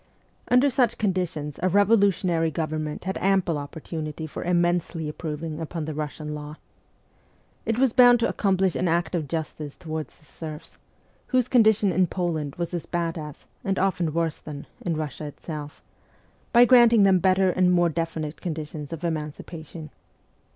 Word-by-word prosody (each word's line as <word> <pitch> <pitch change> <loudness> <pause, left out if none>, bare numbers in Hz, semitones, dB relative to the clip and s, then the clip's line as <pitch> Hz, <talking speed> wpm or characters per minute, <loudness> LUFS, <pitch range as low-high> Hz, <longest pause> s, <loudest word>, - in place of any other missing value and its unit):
Under 250 +3 +5
such 245 -4 +2
conditions 175 -8 -2
a 185 - +2
revolutionary 195 -4 +3
government 155 -1 -3
had 190 +1 -3
ample 185 -5 +2
opportunity 155 +1 -6
for 155 - -6
immensely 175 -2 0
improving 155 0 -5
upon 160 0 -4
the 155 - -4
Russian 150 0 -5
law. 150 0 -7 1.1
It 225 - +1
was 260 -2 +3
bound 245 -1 +7
to 230 - +3
accomplish 190 -4 +1
an 180 +7 0
act 170 0 0
of 160 -5 -1
justice 155 -1 -5
towards 155 -2 -6
the 155 - -21
serfs 155 +1 -9 0.5
whose 255 -2 +2
condition 220 -5 +4
in 185 0 +3
Poland 160 -6 -2
was 175 0 -4
as 175 - -4
bad 170 -1 -1
as, 150 -3 -8 0.2
and 195 -1 -1
often 180 -4 +1
worse 165 0 -1
than, 145 -2 -8 0.2
in 165 -3 -2
Russia 155 -1 -4
itself 150 0 -8 0.7
by 240 -1 +7
granting 235 -3 +6
them 190 -2 +5
better 185 0 +3
and 180 0 +3
more 175 -1 +4
definite 160 -1 -4
conditions 155 -4 -5
of 165 0 -6
emancipation. 155 0 -5
165 Hz, 155 wpm, -25 LUFS, 155-190 Hz, 1.1 s, bound